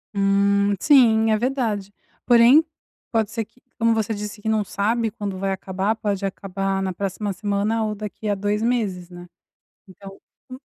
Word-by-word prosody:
Hum, 200 0 +2
sim, 225 -6 +5
é 215 - +3
verdade, 230 -6 -2 0.3
porém, 245 +6 +6 0.5
pode 225 -3 0
ser, 225 -3 -4 0.3
como 230 0 +3
você 220 0 -1
disse 210 +1 -6
não 220 -1 +1
sabe 225 +3 -1
quando 200 -3 -6
vai 195 0 -1
acabar, 190 +2 -2
pode 205 -3 -3
acabar 195 0 -2
na 190 - -2
próxima 195 +2 -3
semana 205 +3 -1
ou 215 -1 -2
daqui 210 +1 -6
há 205 - +1
2 205 +2 -1
meses, 210 -7 -1
né, 175 0 -11 0.6
então, 195 +1 -13 0.3
o 255 - -8
205 Hz, 155 wpm, -22 LUFS, 195-225 Hz, 0.6 s, porém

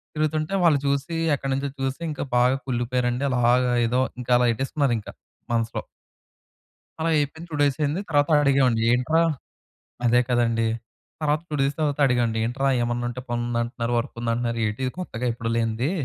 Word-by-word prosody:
తిరుగుతుంటే 155 +2 -1
వాళ్ళు 155 -4 +5
చూసి 140 +4 0 0.2
ఎక్కడినుంచో 135 +1 -2
చూసి 135 +4 -2
ఇంకా 145 - -4
బాగా 125 +2 +4
కుళ్ళిపోయారండి. 125 +1 0
అలాగా 125 0 +3
ఏదో 125 +2 +1 0.2
ఇంకా 125 - -5
అలా 125 - +3
ఎట్టేసుకున్నారింక 130 -3 -1 0.4
మనసులో. 115 0 -1 1.2
అలా 165 +1 0
అయిపోయింది. 155 +3 -2
2 155 - -5
డేస్ 140 -2 +2
అయింది. 150 +6 0
తర్వాత 145 -1 +2
అడిగామండి. 130 -5 +3
ఏంట్రా 130 +7 +2 0.8
అదే 120 +1 +5
కదండీ. 115 -2 +2 0.5
తర్వాత 150 0 +1
2 155 - -5
డేస్ 140 +1 +1
తర్వాత 150 -1 0
అడిగా 125 -2 +2
అండి. 115 0 -2
ఏంట్రా 135 +4 0
ఏమన్నా 120 0 -1
ఉంటే 125 +1 -5
పని 120 0 -1
ఉందంటున్నారు. 120 0 -2
వర్క్ 115 - -4
ఉందంటున్నారు 115 0 -1
ఏటి? 105 +4 -4
ఇది 130 - -3
కొత్తగా 125 -9 -5
ఎప్పుడూ 115 0 -4
లేనిది. 115 +4 0
125 Hz, 155 wpm, -24 LUFS, 120-140 Hz, 1.2 s, వాళ్ళు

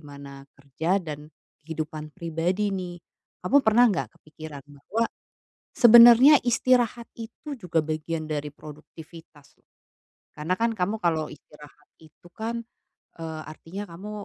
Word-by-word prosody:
mana 140 -1 -11
kerja 155 +7 -1
dan 150 -3 -8 0.3
kehidupan 155 -1 -6
pribadi 180 +5 -2
nih. 180 -2 -5 0.4
Kamu 270 +10 +3
pernah 235 +3 +5
nggak 135 - -3
kepikiran 155 -2 -11
bahwa 145 +11 -3 0.7
sebenarnya 240 +4 +9
istirahat 240 -1 +1
itu 230 +6 -8
juga 170 -5 0
bagian 155 +1 -4
dari 150 -1 -3
produktivitas, 155 0 -14
loh. - - -39 0.7
Karena 155 +5 -1
kan 230 +1 0
kamu 190 +4 0
kalau 160 -3 0
istirahat 150 0 -16
itu 160 +2 -19
kan, 230 +3 -4 0.6
eee, 160 -1 -6
artinya 165 +5 -9
kamu 190 +5 -9
165 Hz, 120 wpm, -25 LUFS, 150-215 Hz, 0.7 s, sebenarnya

